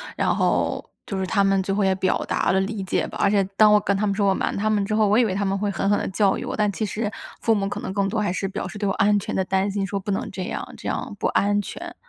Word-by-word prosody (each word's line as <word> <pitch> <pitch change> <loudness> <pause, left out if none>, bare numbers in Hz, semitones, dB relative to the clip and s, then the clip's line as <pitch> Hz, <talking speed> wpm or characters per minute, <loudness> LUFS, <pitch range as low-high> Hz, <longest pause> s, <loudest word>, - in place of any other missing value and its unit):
然 - - +1
后 - - 0 0.2
就 195 - -4
是 190 - -1
他 200 +1 +2
们 195 -1 +3
最 195 - -1
后 205 0 +1
也 190 0 +3
表 185 0 +1
达 - - +1
了 190 - +3
理 200 0 -3
解 190 - -1
吧， - - -8
而 200 - +4
且 200 -1 +3
当 215 -1 +7
我 210 - +6
跟 200 -1 0
他 210 - 0
们 200 -1 0
说 200 -1 +2
我 195 - +4
瞒 - - -1
他 215 +2 0
们 205 -2 +1
之 215 - -2
后， 215 -1 +3
我 210 +3 +3
以 245 - +5
为 190 - -1
他 200 +1 -1
们 195 0 0
会 205 +1 -1
狠 195 - -1
狠 205 - +3
地 - - -2
教 195 0 +2
育 - - -5
我， - - -3
但 210 -1 +1
其 215 +3 -2
实 210 +1 -3 0.3
父 225 - +3
母 195 -1 0
可 - - -4
能 - - -5
更 200 -1 +1
多 215 +2 -1
还 205 - 0
是 195 +1 -2
表 190 - -4
示 205 - -8
对 205 -1 -1
我 195 - +1
安 205 +1 +3
全 - - -4
的 190 - +1
担 190 +2 0
心， 195 0 -1
说 200 0 -3
不 200 +2 -4
能 195 - -2
这 190 -1 -5
样， - - -5
这 - - -7
样 - - -3
不 - - +1
安 205 0 +2
全， - - -8
200 Hz, 355 characters per minute, -23 LUFS, 195-210 Hz, 0.3 s, 当